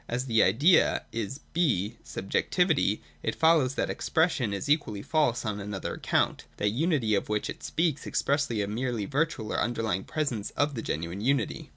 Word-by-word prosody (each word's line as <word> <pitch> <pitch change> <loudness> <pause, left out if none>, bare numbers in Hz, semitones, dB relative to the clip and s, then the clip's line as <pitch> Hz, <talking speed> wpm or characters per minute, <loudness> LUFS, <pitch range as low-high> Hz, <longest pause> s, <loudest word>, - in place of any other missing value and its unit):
As 125 +2 -2
the 115 -4 +3
Idea 140 - +4
is 115 +5 -4
(6) 120 - +1
subjectivity, 140 - 0 0.2
it 115 - -2
follows 160 -5 +3
that - - +1
the - - -4
expres 165 +2 +1
sion 120 -7 -2
is 100 +8 -3
equally 145 -9 0
false 145 -7 +1
on 105 -1 -2
another 100 -1 -4
account. - - 0
That 105 - +1
unity 130 - +1
of 100 - 0
which 105 -1 -1
it - - -10
speaks 160 -4 -1
expresses 140 -7 0
a - - -1
merely 115 +1 -2
virtual 140 -4 -1
or - - 0
underlying 110 -5 -1
presence 140 -10 -2
of 145 0 +2
the 115 - -4
genuine 85 +4 -4
unity. 130 -1 0
120 Hz, 180 wpm, -28 LUFS, 105-150 Hz, 0.2 s, Idea